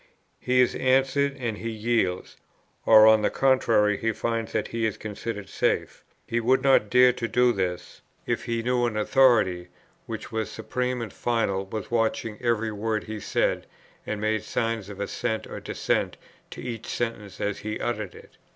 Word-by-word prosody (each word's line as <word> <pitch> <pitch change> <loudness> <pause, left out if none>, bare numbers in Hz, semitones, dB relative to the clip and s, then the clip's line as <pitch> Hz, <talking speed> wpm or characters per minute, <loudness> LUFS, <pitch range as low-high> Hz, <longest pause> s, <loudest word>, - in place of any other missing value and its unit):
He 125 0 +3
is 125 - +2
answered, 135 +2 +2
and 115 -5 -3
he 115 - -4
yields; 110 -5 -1 0.5
or 110 -1 +9
on 110 0 +6
the - - +2
contrary 115 -6 +3
he 115 - 0
finds 115 0 -2
that 110 - -2
he 115 -1 0
is 110 - -4
considered 105 -1 -6
safe. - - -1 0.2
He 120 - -1
would 130 +3 +2
not 135 -6 +4
dare 125 +1 +6
to 115 -1 -3
do 125 +1 +3
this, 90 -3 -4 0.2
if - - -2
he 115 -1 -2
knew 125 0 +1
an 110 -2 -3
authority, 105 -7 +3 0.4
which - - -6
was 110 -1 -2
supreme 125 +2 -3
and 110 - -8
final, 100 -5 -1
was 110 +1 -6
watching 115 -1 -1
every 115 -2 0
word 105 +1 -2
he 110 0 -6
said, - - -1 0.4
and 105 - -4
made 110 0 0
signs 115 -1 -2
of 100 -1 -9
assent 110 +2 -2
or - - -7
dissent - - -1 0.3
to - - -9
each 115 -3 -6
sentence, 115 -4 -4
as 100 -1 -2
he 110 0 -4
uttered 105 -6 -3
it. - - -16
115 Hz, 175 wpm, -26 LUFS, 105-120 Hz, 0.5 s, or